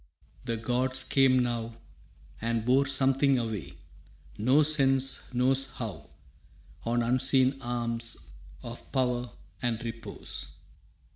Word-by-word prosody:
The 115 -1 -2
gods 125 +3 +1
came 135 -1 +3
now 120 -2 -1 0.7
And 115 -1 -1
bore 135 +3 +3
something 135 0 +3
away, 110 -6 -4 0.6
no 130 +8 +3
sense 135 -3 +3
knows 130 +2 +2
how, 100 - -7 0.8
On 120 +1 +1
unseen 130 +2 +3
arms 115 -1 -3 0.3
of 120 0 -9
power 125 -2 0 0.3
and 120 -2 -2
repose. 115 0 -7
125 Hz, 100 wpm, -28 LUFS, 115-135 Hz, 0.8 s, came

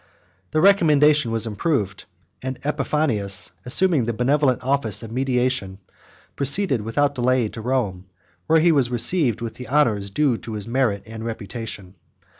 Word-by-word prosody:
Their 155 +1 0
recommendation 150 -8 +4
was 115 0 -1
approved; 105 - -2 0.4
and 130 0 -4
Epiphanius, 140 -9 0 0.2
assuming 155 -1 +2
the 120 - -2
benevolent 130 +1 +1
office 130 -5 -1
of 110 - -9
mediation, 125 -5 -1 0.6
proceeded 140 - +2
without 140 +7 0
delay 125 -3 +1
to 115 - -8
Rome, 110 -7 -2 0.4
where 160 0 +4
he 170 +1 +4
was 135 -6 +2
received 125 - +2
with 115 -1 -5
the 125 - -10
honors 115 -9 +1
due 125 +3 +1
to 110 - -8
his 105 0 -5
merit 115 -5 0
and 110 0 -9
reputation. 110 -3 -7
125 Hz, 145 wpm, -22 LUFS, 110-145 Hz, 0.6 s, recommendation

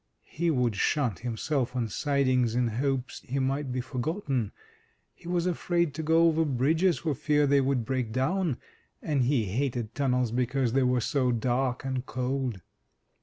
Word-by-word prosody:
He 170 +2 0
would 125 -7 +1
shunt 120 - +1
himself 125 +2 -2
on 120 -3 0
sidings 130 -1 +1
in 125 -1 +2
hopes 130 +2 -2
he 135 - -4
might 135 +1 -1
be 125 0 -1
forgotten; 130 - -2 0.6
he - - -15
was 175 -1 0
afraid 170 -3 0
to 160 - -4
go 160 +2 +4
over 160 -1 +3
bridges, 160 +6 +2
for 160 -3 -1
fear 150 +2 +2
they 140 0 +4
would 130 -3 0
break 125 -2 -2
down; 145 - 0 0.5
and 145 -4 +1
he 125 -4 +2
hated 120 +1 -2
tunnels 125 -4 +1
because 125 0 0
they 135 - +3
were 125 -1 +2
so 130 +1 +1
dark 125 +2 0
and 130 -1 -3
cold. 130 -5 -2
130 Hz, 165 wpm, -28 LUFS, 125-145 Hz, 0.6 s, go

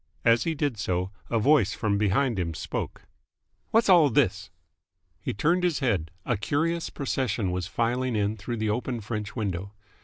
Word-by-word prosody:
As 115 0 +4
he 165 -1 0
did 145 -7 -1
so, 90 -1 -1 0.2
a 115 - +1
voice 125 -2 +4
from 100 -3 0
behind 105 +2 +2
him 85 -3 -2
spoke. - - -4 0.7
"Whassall 185 -9 +6
this?" 100 -7 +1 0.7
He - - -2
turned 165 - +1
his 175 -4 +2
head. 100 - 0 0.2
A 120 - 0
curious 160 - 0
procession 125 - -1
was 90 -1 -2
filing 120 +4 0
in 105 0 +1
through 115 +3 -5
the 110 -1 -1
open 120 +1 -2
French 105 0 -5
window. 100 -3 -3
115 Hz, 160 wpm, -27 LUFS, 100-140 Hz, 0.7 s, Whassall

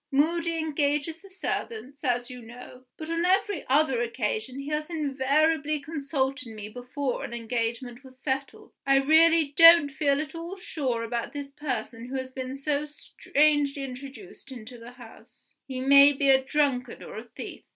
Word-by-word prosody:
Moody 330 +4 +1
engages 300 0 -1
the 390 - -16
servants, 380 - -5
as 245 -1 -1
you 250 -1 -9
know; 245 +2 -12
but 315 - -7
on 335 +1 0
every 385 +2 +1
other 270 -3 +2
occasion 235 +1 -2
he 275 +1 -6
has 305 +1 -2
invariably 300 0 +1
consulted 280 -2 -3
me 215 -2 -8
before 250 +3 -4
an 235 - -6
engagement 235 +2 -3
was 260 -1 -15
settled. 270 0 -4
I 275 0 +3
really 315 +1 +4
don't 330 -3 +8
feel 280 0 +1
at 300 -2 -5
all 340 +3 -7
sure 265 -10 -3
about 235 0 -4
this 285 -1 -6
person 245 -5 -5
who 265 - -6
has 260 -1 -4
been 260 0 -5
so 290 +1 -2
strangely 290 -1 0
introduced 270 +4 -10
into 240 -1 -10
the 235 +2 -11
house 245 -3 -17
he 260 -2 -5
may 280 +2 +7
be 275 0 +3
a 265 0 +4
drunkard 265 -4 -1
or - - -9
a 220 - -6
thief. 240 - -9
275 Hz, 165 wpm, -27 LUFS, 250-305 Hz, -, don't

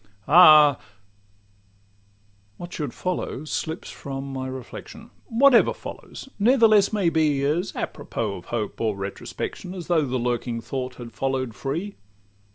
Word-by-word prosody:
Ah!—What 175 0 -9
should 150 -3 -4
follow 180 -5 -4
slips 160 +2 -4
from 135 0 -6
my 130 0 -4
reflection; 130 - -9 0.2
Whatever 245 +1 +5
follows - - -9
ne'ertheless 220 -3 +5
may 200 -5 +2
be 155 -4 +1
As 165 +7 0
à - - -1
propos 105 -4 -5
of 85 - -17
hope 110 -3 -4
or 110 -3 0
retrospection, 100 - -6
As 175 -3 -6
though 170 -3 +2
the 130 0 -1
lurking 120 -1 -2
thought 125 +2 -5
had 120 -2 -9
follow'd 130 -3 -2
free. 155 - -4
140 Hz, 130 wpm, -24 LUFS, 125-180 Hz, 0.2 s, Whatever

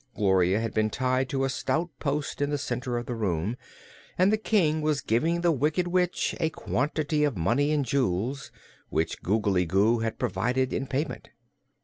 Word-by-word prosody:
Gloria 95 -1 +3
had 115 0 -3
been 110 0 +1
tied 130 +2 0
to 135 -1 -1
a 135 - +1
stout 165 +5 -1
post 145 0 -2
in 145 - +1
the 145 - 0
center 125 -3 -3
of 120 - -4
the 125 - -4
room 100 -1 -1 0.6
and 185 +3 +4
the - - +3
King 175 -8 +2
was 150 -2 +1
giving 160 +9 +1
the 170 -1 +3
Wicked 155 +5 +1
Witch 180 0 +1
a 160 -2 +1
quantity 150 +1 -1
of 145 -8 0
money 145 - +1
and 145 -3 +1
jewels, 130 +1 -1 0.4
which 80 - -1
Googly 95 -3 +1
Goo 105 +6 +3
had 115 0 -2
provided 125 +7 0
in 135 - -2
payment. 145 +4 -3
135 Hz, 175 wpm, -27 LUFS, 110-150 Hz, 0.6 s, and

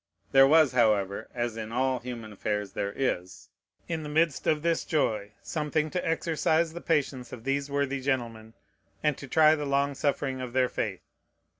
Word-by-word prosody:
There 135 0 +7
was, 155 -2 +5
however, 105 -4 +1
(as 120 -2 -2
in 110 0 -5
all 130 +1 +1
human 120 -3 -7
affairs 105 0 -2
there 100 +1 -2
is,) 95 -8 -3 0.4
in 165 -2 -2
the 150 - -6
midst 155 -1 +1
of 155 -1 +2
this 170 -1 +1
joy, 110 -9 -1
something 155 0 -1
to 180 - -2
exercise 165 0 +1
the 170 - -7
patience 135 -6 -1
of 115 - -9
these 140 +2 -1
worthy 140 -1 -1
gentlemen, 115 -4 -3 0.5
and 150 -2 +2
to 140 - -8
try 155 +3 +5
the 150 -2 -2
long 140 0 +1
suffering 135 -1 -1
of 125 -2 -6
their 130 -1 +2
faith. 100 -4 -3
135 Hz, 175 wpm, -28 LUFS, 115-150 Hz, 0.5 s, There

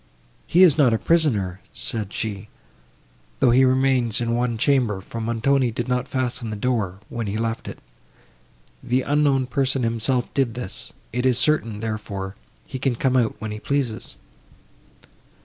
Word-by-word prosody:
"He 180 +3 +5
is 160 -4 +6
not 130 -6 +5
a - - +3
prisoner," 110 - +1
said 105 -3 -3
she, 105 -2 -4 0.9
"though 130 -3 +5
he 130 +2 +5
remains 130 -3 +3
in 115 -1 -1
one 120 -1 0
chamber, 120 -5 +2
for 115 +4 -7
Montoni 120 +3 +1
did 120 +2 -4
not 125 +1 0
fasten 125 -3 -2
the 105 - -3
door, 105 -5 -1
when 115 -2 -4
he 100 +2 -2
left 115 0 -2
it; - - -7 1.0
the 125 +2 0
unknown 145 -2 +2
person 135 0 0
himself 115 +2 0
did 130 -4 0
this; 120 -6 -6 0.2
it 125 +1 -1
is 130 -2 +3
certain, 120 -5 +1
therefore, 105 -3 -4 0.3
he 130 - -6
can 135 -1 +1
come 130 +2 +1
out 120 -4 +2
when 110 -1 -5
he 105 - -5
pleases." 120 - -2
120 Hz, 160 wpm, -23 LUFS, 110-130 Hz, 1.0 s, is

